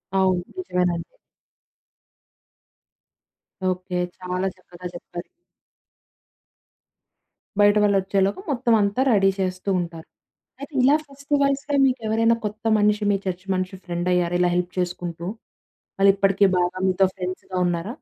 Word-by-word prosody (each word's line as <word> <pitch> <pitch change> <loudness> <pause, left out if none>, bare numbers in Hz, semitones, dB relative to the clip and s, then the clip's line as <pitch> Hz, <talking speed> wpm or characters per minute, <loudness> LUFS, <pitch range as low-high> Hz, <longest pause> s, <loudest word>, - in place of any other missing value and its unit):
అవును. 185 -2 +3 0.2
నిజమేనండి. 180 - -2 2.5
ఓకే. 185 0 -3 0.2
చాలా 180 +1 -2
చక్కగా 180 0 -10
చెప్పారు. 175 0 -8 2.3
బయట 205 +1 +6
వాళ్ళొచ్చేలోపు 195 - +1
మొత్తమంతా 230 -3 +2
రెడీ 195 -1 +4
చేస్తూ 185 +1 -2
ఉంటారు. 165 -2 -6 0.5
అయితే 285 +2 -8
ఇలా 275 +3 +5
ఫెస్టివల్స్‌లో 280 0 0
మీకెవరైనా 230 -3 +2
కొత్త 215 +2 -7
మనిషి 210 0 +2
మీ 200 - +3
చర్చ్ 185 0 -3
మనిషి 185 +1 -2
ఫ్రెండ్ 175 0 -3
అయ్యారా? 175 -1 +1
ఇలా 180 - +4
హెల్ప్ 180 0 -1
చేసుకుంటూ. 175 -1 -3 0.7
వాళ్ళిప్పటికి 195 0 +4
బాగా 180 +1 0
మీతో 190 +1 +3
ఫ్రెండ్స్‌గా 185 0 -5
ఉన్నారా? 175 +2 -2
190 Hz, 105 wpm, -23 LUFS, 180-210 Hz, 2.5 s, బయట